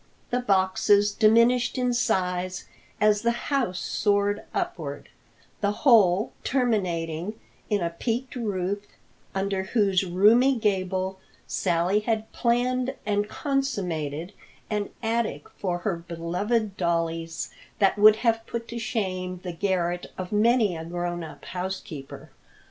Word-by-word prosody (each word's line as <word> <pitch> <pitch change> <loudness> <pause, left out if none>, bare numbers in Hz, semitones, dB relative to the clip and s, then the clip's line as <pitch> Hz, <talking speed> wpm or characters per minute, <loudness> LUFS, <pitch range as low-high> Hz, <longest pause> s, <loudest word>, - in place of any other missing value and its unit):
The 245 - +2
boxes 200 -1 +3
diminished 235 +4 +4
in 250 -1 +1
size 185 -6 0 0.3
as 210 -1 +4
the 235 - +2 0.2
house 230 -10 +1
soared 205 0 +1
upward, 360 -3 -4 0.5
the 200 -1 +1
whole 210 -5 +5
terminating 185 - -1 0.3
in 205 -2 +1
a 170 - -1
peaked 240 +9 -3
roof 200 -4 -2 0.5
under 195 0 0
whose 195 -2 +2
roomy 215 +9 +5
gable 190 -3 -1 0.3
Sally 180 +2 +1
had 220 0 -2
planned 250 +2 +1
and 205 0 0
consummated 180 - -2 0.4
an 210 -1 -1
attic 225 -10 -1
for 180 -3 -2
her 175 0 -2
beloved 180 +6 -2
dollies 165 -1 -1 0.3
that 200 0 +3
would 215 +1 +8
have 225 -1 +3
put 235 0 -4
to 235 - -4
shame 185 -5 -2
the 180 -2 -4
garret 175 -1 -1
of 185 -1 -5
many 215 -2 +3
a 160 - -5
grown 175 0 -3
up 160 - -10
housekeeper. 180 -6 -6
200 Hz, 120 wpm, -26 LUFS, 180-230 Hz, 0.5 s, would